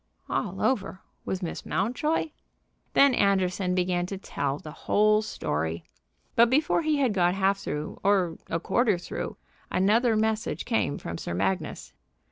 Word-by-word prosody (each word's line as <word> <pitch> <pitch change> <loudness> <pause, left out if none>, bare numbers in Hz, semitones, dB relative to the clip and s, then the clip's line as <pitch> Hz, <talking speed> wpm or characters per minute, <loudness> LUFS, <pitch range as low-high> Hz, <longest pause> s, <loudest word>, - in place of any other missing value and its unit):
"All - - -2
over 200 -7 0 0.3
with 190 0 -3
Miss 170 - -4
Mountjoy?" 255 - -1 0.6
Then 280 -1 +6
Anderson 185 -3 +1
began 180 -1 0
to 195 - -5
tell 140 -7 -3
the 155 - -9
whole 215 +6 +3
story; 80 - -3 0.5
but 235 0 +6
before 295 +6 +2
he 310 -2 +1
had 260 -6 +2
got 180 -1 +2
half 195 0 +2
through, 150 -4 -5
or 185 -4 +2
a 165 - 0
quarter 215 +3 +2
through, 175 - -5 0.3
another 220 +5 +3
message 220 0 -1
came 225 -11 0
from 85 0 -6
Sir 85 - -4
Magnus. 95 0 -2
195 Hz, 145 wpm, -27 LUFS, 175-225 Hz, 0.6 s, Then